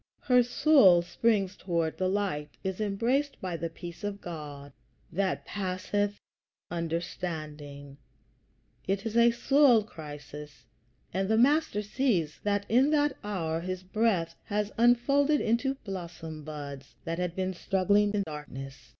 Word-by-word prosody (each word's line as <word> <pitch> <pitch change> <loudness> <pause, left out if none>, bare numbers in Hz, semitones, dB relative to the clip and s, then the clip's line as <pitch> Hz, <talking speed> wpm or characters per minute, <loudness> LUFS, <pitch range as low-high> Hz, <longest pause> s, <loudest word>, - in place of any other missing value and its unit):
Her 250 -2 +5
soul 240 - +5
springs 195 +1 +1
toward 170 -3 -2
the 185 - +1
light; 185 -7 -1
is 190 +2 -3
embraced 240 +8 0
by 185 -2 -3
the 165 0 -3
peace 170 +4 -9
of 205 -1 -3
God 145 -5 -8 0.4
that 190 +2 -1
passeth 205 +1 -2 0.5
understanding. 155 -4 -5 0.9
It 195 +3 -1
is 225 0 -3
a 235 0 +6
soul 245 -1 +4
crisis, 150 - -10 0.5
and 190 +2 0
the 220 - +3
Master 260 -4 +3
sees 205 - 0
that 205 -1 0
in 255 +5 +4
that 295 -2 +2
hour 165 -6 -2
his 185 +1 -4
breath 185 -4 +1
has 210 0 -1
unfolded 275 +5 +4
into 245 +4 +1
blossom 170 -5 -7
buds 145 -2 -8
that 165 +1 -3
had 180 -1 -2
been 185 0 -1
struggling 200 +3 +2
in 200 - +1
darkness. 145 -4 -8
190 Hz, 135 wpm, -29 LUFS, 165-220 Hz, 0.9 s, a